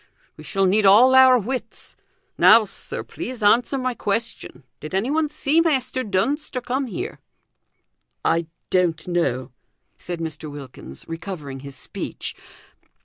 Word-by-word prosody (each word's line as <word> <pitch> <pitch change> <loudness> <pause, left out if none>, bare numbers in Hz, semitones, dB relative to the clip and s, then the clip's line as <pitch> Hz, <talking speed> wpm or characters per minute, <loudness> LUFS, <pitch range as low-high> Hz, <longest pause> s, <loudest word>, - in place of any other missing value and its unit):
We - - -12
shall 195 -1 0
need 205 +3 +3
all 235 +7 +7
our 260 -1 +8
wits. 250 +3 -5 0.4
Now, 220 0 +7
sir, 195 - -7
please 245 -3 -7
answer 240 +6 +3
my 255 -1 -1
question. 225 - -3 0.2
Did 155 +5 -6
anyone 290 +10 +1
see 300 +2 +2
Measter 260 -5 0
Dunster 255 +7 -1
come 260 +2 -2
here?" 200 - -5 1.1
"I 165 0 +1 0.2
don't 175 -3 +1
know," 130 -8 -1 0.5
said 175 -1 -6
Mr. 155 -1 -5
Wilkins, 130 - -10
recovering 165 -5 -6
his 140 0 -10
speech. - - -6
205 Hz, 130 wpm, -22 LUFS, 165-255 Hz, 1.1 s, our